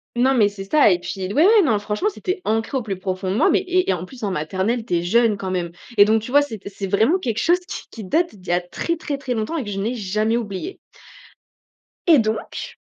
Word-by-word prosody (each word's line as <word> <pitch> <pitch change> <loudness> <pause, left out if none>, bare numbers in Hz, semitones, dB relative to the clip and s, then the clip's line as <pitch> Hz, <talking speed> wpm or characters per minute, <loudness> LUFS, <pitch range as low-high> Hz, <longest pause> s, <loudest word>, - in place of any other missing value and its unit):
Non, 255 +3 +3
mais 215 -5 +4
c'est 200 -1 -8
ça, 285 +8 +4
et 175 - +3
puis 190 +1 -5
ouais, - - -4
ouais, 430 +1 +6
non 230 -10 +2
franchement, 210 - -1
c'était 370 -2 -4
ancré 225 +5 -1
au 260 - -1
plus 200 -4 -4
profond 185 0 -3
de 195 - -1
moi, 320 - +4
mais - - +4
et 370 -1 0
et 190 - +4
en 175 -1 -4
plus 245 +2 -13
en 200 - -1
maternelle, 190 +9 -1
tu 220 -6 -1
es 170 - +1
jeune 225 +2 +3
quand 190 -1 -4
même, 175 -2 -2 0.3
et 205 - +8
donc 220 0 +2
tu 250 - -7
vois, 290 +1 +6
c'étais 220 -8 -6
c'est 195 0 -5
vraiment 225 - +2
quelque 230 - -3
chose 345 +7 +3
qui - - -6
qui 220 - -8
date 325 - 0
d'il 185 -2 -17
y - - -1
a 175 - +3
très, 335 - -3
très, 290 -3 -4
très 255 -3 -3
longtemps 220 +10 -2
et 290 - -2
que 210 - -7
je 195 -1 -3
n'ai 225 +5 -1
jamais 215 +1 0
oublié. 230 - -5 1.3
Et 320 -5 +7
donc, 220 -1 -3
220 Hz, 260 wpm, -21 LUFS, 195-280 Hz, 1.3 s, et